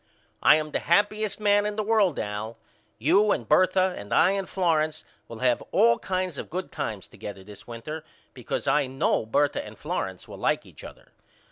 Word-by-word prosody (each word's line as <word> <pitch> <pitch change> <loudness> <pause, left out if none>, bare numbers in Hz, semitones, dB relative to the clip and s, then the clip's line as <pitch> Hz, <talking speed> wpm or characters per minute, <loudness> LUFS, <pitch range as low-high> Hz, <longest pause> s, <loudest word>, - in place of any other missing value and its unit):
I - - +7
am 155 -1 -2
the - - 0
happyest 205 +5 +1
man 205 -1 +3
in 210 0 -2
the 215 - -1
world 210 -6 +2
Al. 105 +2 -4 0.4
You 185 - +3
and 115 - -1
Bertha 185 +3 +3
and 100 - -9
I 180 - +5
and 195 -1 -2
Florence 160 -4 0 0.2
will 115 0 -9
have 125 -2 +2
all 115 0 +4
kinds 185 -4 -2
of - - -7
good 185 +3 -4
times 105 -4 -4
together 100 -2 -9
this 105 +1 -14
winter 150 +7 -7 0.3
because 125 +2 -4
I 140 0 +3
know 130 -4 0
Bertha 145 +5 +1
and - - -11
Florence - - -4
will - - -10
like - - 0
each - - -14
other. - - -13
155 Hz, 190 wpm, -26 LUFS, 115-190 Hz, 0.4 s, I